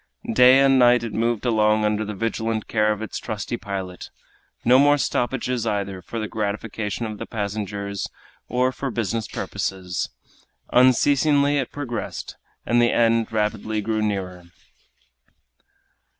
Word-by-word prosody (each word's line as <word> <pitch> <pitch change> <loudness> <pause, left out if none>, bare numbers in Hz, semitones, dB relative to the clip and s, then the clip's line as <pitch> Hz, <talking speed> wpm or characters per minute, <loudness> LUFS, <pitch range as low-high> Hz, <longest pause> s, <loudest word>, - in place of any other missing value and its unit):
Day 125 +2 +7
and 135 -1 +5
night 120 -1 +5
it 115 -3 -5
moved 115 +1 0
along 110 -2 +3
under 105 0 0
the 105 0 -5
vigilant 110 +1 -2
care 105 -1 +2
of 105 0 -3
its 110 - -5
trusty 110 +1 -4
pilot; 95 -4 -6 0.6
no 125 +2 +6
more 145 +1 +5
stoppages 125 -3 -1
either 100 -3 -2
for 115 - -7
the 110 -1 -2
gratification 105 +1 -3
of 110 -1 -6
the - - -6
passengers 100 -2 -4 0.4
or 125 +1 +1
for 135 +1 -4
business 115 -2 -2
purposes. 90 -2 -3 0.6
Unceasingly 140 +3 +4
it 130 - -3
progressed, 135 -5 -5 0.3
and 120 0 +3
the 120 - +3
end 115 -1 +2
rapidly 110 0 -1
grew 110 +1 -1
nearer. 95 -4 -3
110 Hz, 135 wpm, -23 LUFS, 105-125 Hz, 0.6 s, Day